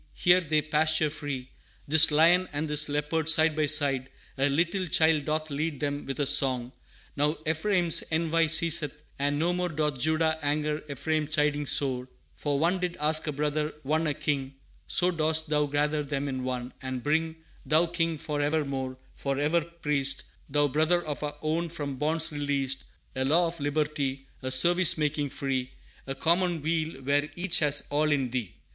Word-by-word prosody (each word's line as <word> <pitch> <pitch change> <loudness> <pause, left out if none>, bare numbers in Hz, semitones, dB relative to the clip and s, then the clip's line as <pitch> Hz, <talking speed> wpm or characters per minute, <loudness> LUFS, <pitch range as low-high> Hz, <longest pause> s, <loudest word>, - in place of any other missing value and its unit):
here 180 +1 +4
they 155 -2 0
pasture 155 0 +1
free, 145 -4 -5 0.4
This 160 +2 +8
lion 170 +4 +4
and 150 +2 -3
this 150 0 +2
leopard, 150 +2 -1
side 160 -1 +5
by 155 -1 +1
side, 140 -4 +2 0.3
A 135 +1 +1
little 170 +6 0
child 160 -2 +3
doth 155 0 -2
lead 150 0 -3
them 145 0 -3
with 135 0 -5
a 145 - +2
song; 130 -3 +3 0.4
Now, 150 +2 +1
Ephraim's 170 +1 +1
envy 165 0 +1
ceaseth, 155 -2 +1 0.2
and 145 +1 0
no 170 +4 +1
more 180 0 -1
Doth 150 -4 -2
Judah 160 +2 +1
anger 150 +1 -1
Ephraim 155 +2 -1
chiding 150 -1 0
sore, 130 -3 0 0.3
For 145 -1 -2
one 170 +5 +1
did 180 -1 -3
ask 155 +1 +1
a - - 0
Brother, 150 +1 -2
one 155 +3 0
a 145 - -1
King, 135 -2 -2 0.3
So 180 +1 +2
dost 160 -1 0
Thou 150 -1 +1
gather 150 +1 0
them 140 -1 -3
in 130 -2 -4
one, 125 -1 -4
and 130 -2 -5
bring 160 +2 0 0.3
Thou, 155 +5 +3
King 165 -1 -1
forevermore, 145 -4 -2 0.2
forever 145 +5 0
Priest, 150 -5 -2 0.3
Thou, 145 +1 +2
Brother 160 +5 +1
of 150 -2 -4
our 150 -1 -4
own 165 +2 -1
from 145 -5 -5
bonds 160 +3 0
released 140 -2 -2 0.3
A 130 - -1
Law 160 +6 +3
of 170 0 -5
Liberty, 145 -2 -2 0.2
A 130 - -3
Service 170 +6 +4
making 150 -1 -1
free, 130 -2 -3 0.4
A 135 - -3
Commonweal 165 -2 0
where 145 +2 +1
each 180 0 +2
has 145 -2 +2
all 150 +1 +1
in 135 -4 0
Thee. 120 -8 -4
150 Hz, 170 wpm, -27 LUFS, 140-160 Hz, 0.4 s, This